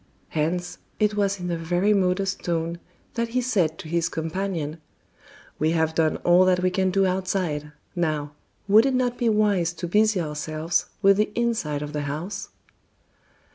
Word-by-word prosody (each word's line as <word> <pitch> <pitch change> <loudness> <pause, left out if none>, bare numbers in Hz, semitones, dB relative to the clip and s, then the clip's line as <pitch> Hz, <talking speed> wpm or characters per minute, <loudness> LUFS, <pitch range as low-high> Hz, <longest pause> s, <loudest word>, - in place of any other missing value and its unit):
Hence, 175 - -2 0.2
it 210 -1 +2
was 200 -1 0
in 180 -1 -3
a 170 - -1
very 175 +5 +1
modest 190 0 0
tone 170 0 -2 0.3
that 235 -1 -1
he 245 +2 -1
said 185 -11 +1
to 190 - -9
his 170 +1 0
companion: 165 -2 -3 0.8
"We 155 +2 +2
have 160 -1 +1
done 160 -1 +1
all 175 +1 +6
that 180 -1 +3
we 185 - +2
can 190 0 +1
do 195 +1 +2
outside, 185 -5 -1 0.2
now, 155 -4 -1 0.4
would 215 +5 +6
it 265 - +1
not 250 -1 0
be 235 - +2
wise 205 -6 +2
to 175 0 -5
busy 210 +2 +3
ourselves 155 +1 -2 0.2
with 195 0 +6
the 210 0 +2
inside 220 -12 -1
of 150 0 -7
the 150 - -2
house?" 175 +8 -4
180 Hz, 170 wpm, -24 LUFS, 160-200 Hz, 0.8 s, all